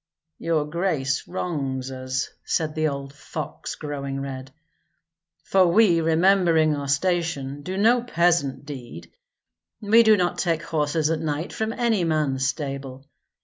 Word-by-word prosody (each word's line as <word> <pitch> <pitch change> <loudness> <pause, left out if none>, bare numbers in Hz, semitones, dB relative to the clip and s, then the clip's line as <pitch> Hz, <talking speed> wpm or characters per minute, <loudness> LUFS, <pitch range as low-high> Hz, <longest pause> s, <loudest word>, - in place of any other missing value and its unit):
"Your 160 -3 0
grace 150 -4 -1
wrongs 135 -8 -3
us," 130 +1 -3
said 155 -2 -1
old 140 -3 -2
fox, 150 +1 -6
growing 140 -2 -5
red, 135 -1 -6 0.9
"for 190 -2 +4
we, 175 -2 +4
remembering 165 -1 +3
our 140 -1 -4
station, 145 -3 -1
do 185 +5 -5
no 235 +4 +4
peasant 170 - +1
deed. 120 - -9 0.7
We 220 +2 +5
do 220 -2 +5
not 175 -1 0
take 165 -3 0
horses 155 0 0
at 160 - 0
night 155 +2 -3
from 220 0 -2
any 230 -5 +1
man's 150 -5 0
stable. 135 -2 -5
155 Hz, 130 wpm, -24 LUFS, 140-175 Hz, 0.9 s, We